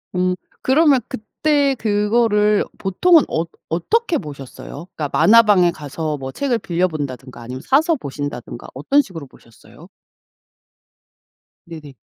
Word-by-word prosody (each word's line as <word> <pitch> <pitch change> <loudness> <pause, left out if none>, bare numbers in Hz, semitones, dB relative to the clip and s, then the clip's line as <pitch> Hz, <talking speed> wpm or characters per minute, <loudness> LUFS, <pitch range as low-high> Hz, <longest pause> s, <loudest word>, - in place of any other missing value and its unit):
음 180 0 +1 0.3
그러면 280 -1 +4
그때 280 +3 0
그거를 210 -1 +2
보통은 315 - +4
어 160 - 0 0.3
어떻게 350 - 0
보셨어요? 145 - -9
그러니까 150 -2 -3
만화방에 205 -5 +5
가서 155 0 -5
뭐 135 -1 -6
책을 250 - -1
빌려 180 -2 0
본다든가 130 -6 -7
아니면 125 +2 -7
사서 315 - +2
보신다든가 140 - -7
어떤 150 - +2
식으로 170 - -10
보셨어요? 115 -3 -18 1.8
네네. 155 -4 -11
185 Hz, 300 characters per minute, -19 LUFS, -, 1.8 s, 만화방에